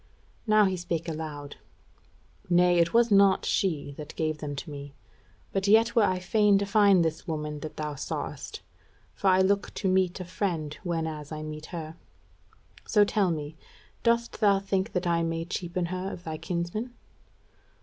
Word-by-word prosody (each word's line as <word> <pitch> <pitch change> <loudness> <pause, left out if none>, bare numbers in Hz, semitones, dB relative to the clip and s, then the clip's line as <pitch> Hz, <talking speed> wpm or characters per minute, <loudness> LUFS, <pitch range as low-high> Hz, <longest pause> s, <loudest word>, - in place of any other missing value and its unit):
Now 215 -1 +5
he 190 -1 0
spake 170 -1 -3
aloud: 155 -3 -6 0.9
"Nay, 175 0 +4
it 170 0 +3
was 235 -1 +4
not 195 -1 +5
she 160 -8 0
that 150 0 -8
gave 155 -1 -1
them 145 -2 -4
to 150 +3 -7
me, 140 -1 -8 0.6
but 195 0 0
yet 225 +3 +5
were 230 - +6
I 185 -3 +2
fain 205 +2 +3
to 200 - 0
find 200 -4 +5
this 160 +3 -3
woman 150 -2 -3
that 155 +1 -8
thou 150 -1 -3
sawest; 140 - -5 0.5
for 200 - -2
I 185 0 +5
look 200 +1 +1
to 195 - -1
meet 185 -1 +2
a 185 - -5
friend 170 -4 -2
whenas 160 -4 -3
I 155 0 -5
meet 155 0 -7
her. 160 -2 -7 0.9
So 210 -2 +5
tell 200 -2 +1
me, 155 -1 -4 0.4
dost 235 -1 +1
thou 200 -2 +5
think 195 +1 -1
that 180 0 -1
I 170 -1 +2
may 165 0 -2
cheapen 175 0 -3
her 185 +2 -4
of 175 - -9
thy 160 -2 -5
kinsman?" 185 +8 -3
175 Hz, 170 wpm, -27 LUFS, 155-195 Hz, 0.9 s, were